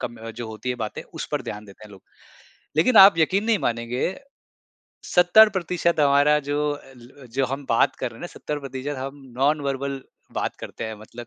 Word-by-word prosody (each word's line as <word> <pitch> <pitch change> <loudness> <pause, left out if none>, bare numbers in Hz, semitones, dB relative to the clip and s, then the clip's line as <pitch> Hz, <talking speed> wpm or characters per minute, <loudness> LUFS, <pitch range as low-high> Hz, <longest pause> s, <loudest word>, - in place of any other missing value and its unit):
कम 120 0 -5
अ, 115 +1 -8
जो 115 +1 -7
होती 110 +3 -7
है - - -1
बातें 110 -2 -5
उस - - -8
पर - - -1
ध्यान 105 +1 -7
देते 100 +1 -15
हैं 105 - -14
लोग। 95 - -15 0.7
लेकिन 215 +9 +3
आप 195 -3 +9
यकीन 185 +6 +2
नहीं 225 -2 +2
मानेंगे, 120 +8 -2 1.0
70% 180 -3 +4
हमारा 145 +1 +4
जो 150 +1 0
अ 135 -2 -10
ल 120 +1 -15
अ, - - -12
जो 130 +3 -1
हम 135 +2 -5
बात 115 - +3
कर 120 - -3
रहे 115 - -14
हैं - - -14
ना - - -5
70% 140 -1 -5
हम 135 +2 -7 0.2
नॉन 145 +2 +2
वर्बल 135 0 -3 0.3
बात - - -2
करते - - -7
हैं 110 - -5
मतलब 120 +2 -11
135 Hz, 200 wpm, -23 LUFS, 120-155 Hz, 1.0 s, आप